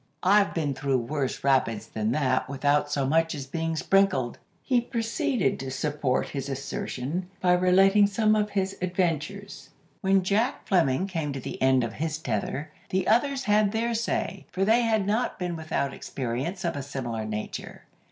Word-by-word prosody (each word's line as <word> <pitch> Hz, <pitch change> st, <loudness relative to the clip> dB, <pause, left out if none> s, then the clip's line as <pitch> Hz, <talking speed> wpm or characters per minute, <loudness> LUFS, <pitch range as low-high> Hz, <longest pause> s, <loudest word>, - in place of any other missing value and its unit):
I've 200 Hz, +2 st, +4 dB
been 150 Hz, -4 st, 0 dB
through 135 Hz, 0 st, 0 dB
worse 130 Hz, +3 st, -3 dB
rapids 115 Hz, -6 st, +2 dB
than 110 Hz, -1 st, -2 dB
that 130 Hz, -2 st, +1 dB
without 145 Hz, +1 st, +1 dB
so 140 Hz, -2 st, 0 dB
much 165 Hz, +3 st, +2 dB
as 140 Hz, -2 st, -5 dB
being 165 Hz, +3 st, -2 dB
sprinkled." 175 Hz, -9 st, +2 dB, 0.2 s
He 250 Hz, -3 st, +2 dB
proceeded 240 Hz, -, -1 dB
to 135 Hz, -, -5 dB
support 135 Hz, -1 st, -1 dB
his 135 Hz, -1 st, -4 dB
assertion 135 Hz, +4 st, -4 dB
by 180 Hz, -1 st, +3 dB
relating 195 Hz, +3 st, +5 dB
some 215 Hz, +1 st, +2 dB
of 210 Hz, -1 st, +1 dB
his 195 Hz, -1 st, -1 dB
adventures. 180 Hz, +2 st, -2 dB, 0.3 s
When 195 Hz, -1 st, +3 dB
Jack 205 Hz, +6 st, 0 dB
Fleming 170 Hz, -3 st, +2 dB
came 165 Hz, -7 st, -3 dB
to 135 Hz, -, -4 dB
the -, -, -7 dB
end 130 Hz, -1 st, +4 dB
of 115 Hz, -, -3 dB
his 155 Hz, 0 st, -2 dB
tether, 130 Hz, +2 st, -3 dB, 0.2 s
the 190 Hz, 0 st, 0 dB
others 270 Hz, +4 st, +2 dB
had 210 Hz, -2 st, +3 dB
their 230 Hz, +1 st, 0 dB
say, 220 Hz, -4 st, -2 dB
for 190 Hz, +1 st, 0 dB
they 225 Hz, +4 st, +4 dB
had 220 Hz, -4 st, +1 dB
not 220 Hz, +5 st, 0 dB
been 180 Hz, -2 st, -3 dB
without 155 Hz, -4 st, -2 dB
experiences 135 Hz, +9 st, -4 dB
of 170 Hz, -, -1 dB
a 140 Hz, -, -3 dB
similar 125 Hz, -5 st, -4 dB
nature. 105 Hz, 0 st, -6 dB
165 Hz, 170 wpm, -27 LUFS, 135-200 Hz, 0.3 s, relating